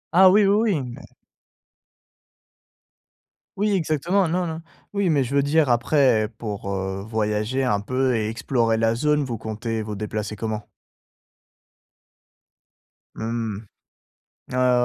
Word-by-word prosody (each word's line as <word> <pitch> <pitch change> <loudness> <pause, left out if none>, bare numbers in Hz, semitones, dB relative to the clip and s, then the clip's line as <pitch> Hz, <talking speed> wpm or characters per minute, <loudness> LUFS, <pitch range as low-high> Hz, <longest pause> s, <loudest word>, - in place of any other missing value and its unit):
Ah 190 0 +8
oui, 205 +2 +5
oui, 210 +1 +3
oui. 145 - -1
Mais - - -12 2.6
Oui, 210 +1 +1
exactement, 175 +2 +1
non, 175 +1 0
non. 160 0 -5 0.3
Oui, 200 -3 +1
mais 140 -3 +3
je 135 +3 -3
veux 140 - +4
dire 150 -1 +2
après 120 -2 +3
pour, 100 -3 -4
heu, 95 0 -3
voyager 110 +4 -1
un 105 -5 +1
peu 130 +2 0
et 110 -1 0
explorer 115 0 0
la 115 0 +2
zone, 150 +3 +2
vous 120 -4 -4
comptez 110 +1 -4
vous 105 0 -5
déplacer 105 0 -4
comment? 110 0 -3 2.5
Mmh. 110 -2 -3 0.9
Ah 125 -1 +3
120 Hz, 125 wpm, -23 LUFS, 110-150 Hz, 2.6 s, Ah